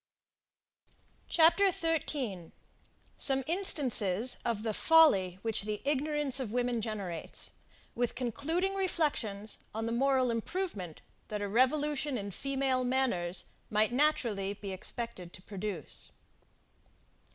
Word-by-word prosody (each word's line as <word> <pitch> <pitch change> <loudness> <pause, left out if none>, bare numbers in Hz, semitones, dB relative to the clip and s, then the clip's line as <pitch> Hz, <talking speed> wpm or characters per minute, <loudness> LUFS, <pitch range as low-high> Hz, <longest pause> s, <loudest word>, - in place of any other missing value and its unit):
CHAPTER 350 +4 +5
13. 285 - -2 0.6
SOME 270 -1 +4
INSTANCES 255 - +1
OF 230 -3 -1
THE 220 -1 -1
FOLLY 200 - +5
WHICH 225 -2 +1
THE 210 0 -3
IGNORANCE 290 -1 +2
OF 245 -6 -4
WOMEN 245 -1 0
GENERATES; 200 -7 -2 0.4
WITH 245 0 -1
CONCLUDING 285 - -1
REFLECTIONS 285 - -1 0.2
ON 225 0 -2
THE 230 - -2
MORAL 260 0 +2
IMPROVEMENT 230 - -4 0.3
THAT 210 -1 -4
A - - -1
REVOLUTION 280 +4 +1
IN 200 -2 -5
FEMALE 270 +2 -1
MANNERS 245 -9 0 0.2
MIGHT 215 +1 +2
NATURALLY 235 -8 +1
BE 200 -1 -7
EXPECTED 185 -2 -4
TO - - -11
PRODUCE. 195 -6 -3
245 Hz, 110 wpm, -31 LUFS, 205-290 Hz, 0.6 s, CHAPTER